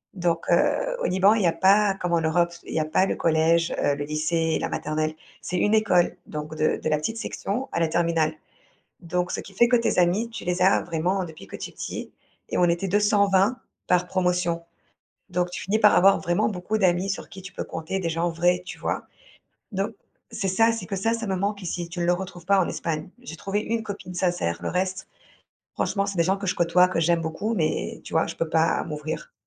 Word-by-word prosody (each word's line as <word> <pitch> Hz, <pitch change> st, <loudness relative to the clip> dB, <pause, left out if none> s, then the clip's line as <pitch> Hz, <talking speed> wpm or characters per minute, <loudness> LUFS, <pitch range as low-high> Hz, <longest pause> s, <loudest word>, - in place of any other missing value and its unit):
Donc 170 Hz, -2 st, 0 dB
heu, -, -, +2 dB
au -, -, +1 dB
Liban, 190 Hz, +3 st, +4 dB
il 215 Hz, -, +1 dB
y -, -, +4 dB
a 165 Hz, -, +4 dB
pas, 195 Hz, +2 st, +4 dB
comme 180 Hz, -1 st, -1 dB
en 170 Hz, -, +3 dB
Europe 170 Hz, +2 st, +1 dB
il -, -, -8 dB
y -, -, +1 dB
a 155 Hz, -, 0 dB
pas 155 Hz, +5 st, +2 dB
le -, -, -1 dB
collège, 165 Hz, +1 st, +2 dB
heu, 145 Hz, -, +3 dB
le 145 Hz, -, -4 dB
lycée, 160 Hz, +2 st, 0 dB
la -, -, -2 dB
maternelle, 155 Hz, +1 st, -2 dB, 0.3 s
c'est 180 Hz, -, -3 dB
une 205 Hz, +4 st, +3 dB
école 205 Hz, -5 st, +3 dB
donc 150 Hz, +1 st, -6 dB
de 155 Hz, 0 st, +1 dB
de -, -, -3 dB
la 150 Hz, -, +2 dB
petite 225 Hz, +10 st, -3 dB
section, 235 Hz, +4 st, -3 dB
à -, -, -1 dB
la 165 Hz, -, +2 dB
terminale. 165 Hz, -1 st, +1 dB, 0.7 s
Donc, 180 Hz, 0 st, -2 dB
ce -, -, -2 dB
qui 195 Hz, -, -13 dB
fait 235 Hz, +5 st, +4 dB
que 250 Hz, -, +4 dB
tes 235 Hz, -5 st, +2 dB
amis, 180 Hz, +6 st, +2 dB
tu -, -, -7 dB
les 180 Hz, 0 st, -1 dB
as, 190 Hz, -, +5 dB
vraiment, 175 Hz, +3 st, -1 dB
depuis 160 Hz, -, -10 dB
que -, -, -9 dB
tu -, -, -6 dB
es -, -, -18 dB
petit -, -, -6 dB, 0.4 s
et -, -, -1 dB
on -, -, +3 dB
était 175 Hz, +3 st, 0 dB
220 205 Hz, +2 st, +3 dB, 0.3 s
par 180 Hz, 0 st, +2 dB
promotion. 180 Hz, -2 st, 0 dB, 0.7 s
Donc, 180 Hz, 0 st, -1 dB
tu -, -, -5 dB
finis 200 Hz, +3 st, +1 dB
par 210 Hz, -, +6 dB
avoir 195 Hz, +2 st, +6 dB
vraiment, 175 Hz, +4 st, +1 dB
beaucoup 195 Hz, +2 st, -2 dB
d'amis 180 Hz, 0 st, +2 dB
sur 195 Hz, -, -4 dB
qui 190 Hz, -, -10 dB
tu 190 Hz, -, -10 dB
peux -, -, -4 dB
compter, 165 Hz, +4 st, -4 dB
des 170 Hz, -3 st, -1 dB
gens 165 Hz, +2 st, 0 dB
vrais, 175 Hz, +2 st, +1 dB
tu -, -, -8 dB
vois? -, -, -2 dB, 0.7 s
Donc 200 Hz, +2 st, -1 dB, 0.4 s
c'est 205 Hz, -4 st, -2 dB
ça, 225 Hz, +5 st, +3 dB
c'est 225 Hz, -5 st, -5 dB
que 195 Hz, +2 st, -4 dB
ça, 225 Hz, +4 st, +1 dB
ça 230 Hz, 0 st, -3 dB
me 190 Hz, -, 0 dB
manque 200 Hz, +1 st, -2 dB
ici, 175 Hz, -1 st, -4 dB
tu 175 Hz, 0 st, -3 dB
le 175 Hz, -, +3 dB
retrouves 180 Hz, -1 st, -6 dB
pas 200 Hz, 0 st, +4 dB
en 175 Hz, -, 0 dB
Espagne. 160 Hz, +1 st, -3 dB
J'ai 165 Hz, -10 st, -9 dB
trouvé 200 Hz, +1 st, -2 dB
une 225 Hz, +1 st, -2 dB
copine 200 Hz, -3 st, -7 dB
sincère, 175 Hz, -, 0 dB
le -, -, -3 dB
reste 185 Hz, +1 st, -2 dB, 0.7 s
franchement, 200 Hz, -1 st, 0 dB
c'est 200 Hz, -1 st, -4 dB
des 170 Hz, -, +4 dB
gens 190 Hz, +3 st, +1 dB
que 195 Hz, -, -5 dB
je -, -, 0 dB
côtoie, 175 Hz, +1 st, +4 dB
que 185 Hz, -, -1 dB
j'aime 170 Hz, +1 st, +3 dB
beaucoup 165 Hz, +8 st, -2 dB
mais, 155 Hz, -6 st, -1 dB
tu -, -, -9 dB
vois, -, -, +2 dB
je -, -, -6 dB
peux 165 Hz, -, -1 dB
pas, 160 Hz, +1 st, +2 dB
m'ouvrir 150 Hz, +1 st, -5 dB
180 Hz, 230 wpm, -25 LUFS, 165-195 Hz, 0.7 s, par